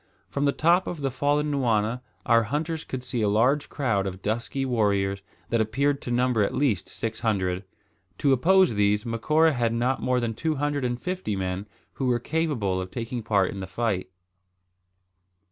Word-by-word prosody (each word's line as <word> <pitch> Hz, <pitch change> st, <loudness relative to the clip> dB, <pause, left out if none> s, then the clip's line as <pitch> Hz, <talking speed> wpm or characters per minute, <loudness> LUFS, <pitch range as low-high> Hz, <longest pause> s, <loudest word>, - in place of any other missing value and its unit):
From 140 Hz, +1 st, -1 dB
the 140 Hz, -, +4 dB
top 170 Hz, +5 st, +3 dB
of 165 Hz, -4 st, -4 dB
the 135 Hz, -1 st, 0 dB
fallen 145 Hz, +3 st, +1 dB
nwana 120 Hz, -3 st, +1 dB, 0.2 s
our 115 Hz, -1 st, +5 dB
hunters 155 Hz, +6 st, -2 dB
could 130 Hz, -1 st, -6 dB
see 120 Hz, -1 st, -3 dB
a 105 Hz, -, +2 dB
large 125 Hz, +8 st, +2 dB
crowd 105 Hz, -8 st, 0 dB
of 95 Hz, 0 st, -7 dB
dusky 115 Hz, +5 st, -1 dB
warriors, 100 Hz, -5 st, +1 dB, 0.3 s
that 115 Hz, -1 st, +2 dB
appeared 140 Hz, +6 st, 0 dB
to -, -, -6 dB
number 120 Hz, -2 st, +2 dB
at 100 Hz, -, 0 dB
least 125 Hz, -11 st, 0 dB
six 115 Hz, -1 st, -4 dB
hundred. 95 Hz, -5 st, 0 dB, 0.5 s
To 140 Hz, -2 st, +3 dB
oppose 185 Hz, +5 st, +4 dB
these, 105 Hz, 0 st, +2 dB
Macora 155 Hz, +8 st, +2 dB
had 120 Hz, -3 st, 0 dB
not 125 Hz, +3 st, 0 dB
more 125 Hz, 0 st, +1 dB
than 115 Hz, -2 st, -1 dB
two 155 Hz, +7 st, -1 dB
hundred 145 Hz, -1 st, -1 dB
and 120 Hz, 0 st, -1 dB
fifty 180 Hz, -, -3 dB
men 95 Hz, +1 st, -3 dB, 0.3 s
who 135 Hz, -, -2 dB
were 125 Hz, -1 st, +3 dB
capable 120 Hz, -, -1 dB
of 95 Hz, -, -6 dB
taking 120 Hz, +3 st, -4 dB
part 100 Hz, -4 st, +2 dB
in 100 Hz, -, -7 dB
the 95 Hz, -, -5 dB
fight. 100 Hz, -3 st, -2 dB
120 Hz, 180 wpm, -26 LUFS, 105-140 Hz, 0.5 s, our